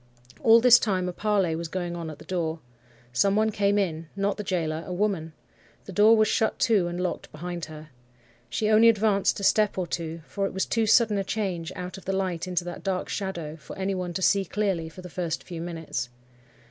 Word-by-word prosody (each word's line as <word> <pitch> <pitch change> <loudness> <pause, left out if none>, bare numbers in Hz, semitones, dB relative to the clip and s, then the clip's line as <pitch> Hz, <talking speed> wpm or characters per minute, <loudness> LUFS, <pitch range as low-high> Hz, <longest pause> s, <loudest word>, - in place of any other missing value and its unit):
"All 230 0 +7
this 245 0 +8
time 185 -5 0
a 180 - -3
parley 195 -5 +1
was 170 +1 -4
going 175 0 -4
on 165 -2 -5
at 155 - -8
the - - -14
door. 165 -3 -2 0.5
Some 195 +9 +3
one 220 +1 +2
came 205 0 +1
in; 165 -5 -1
not 200 +1 0
the 210 - -5
gaoler—a 165 -2 -2
woman. 180 -4 -1 0.5
The - - -8
door 215 +4 +6
was 215 0 +4
shut 220 +1 +1
to 205 -6 +3
and 175 +1 -4
locked 180 -1 -3
behind 175 +1 -5
her. 155 0 -11 0.6
She 215 - -1
only 220 +2 +6
advanced 210 -3 +2
a - - -6
step 210 0 +3
or 185 - 0
two, 165 -1 -5
for 195 +2 -2
it - - -8
was 190 - +1
too 225 -1 0
sudden 210 -2 +4
a - - 0
change, 190 -5 -3
out 180 +1 -6
of - - -19
the 195 - -1
light 185 -3 -2
into 180 -1 -1
that 175 0 -7
dark 190 -2 -2
shadow, 170 -6 -4
for 150 - -11
any 195 +1 -1
one 180 -2 -3
to 190 - -3
see 200 +3 +4
clearly 190 -4 -1
for 180 +3 -12
the - - -7
first 170 -1 -3
few 170 -3 -7
minutes. 165 -7 -4
185 Hz, 220 wpm, -26 LUFS, 170-205 Hz, 0.6 s, this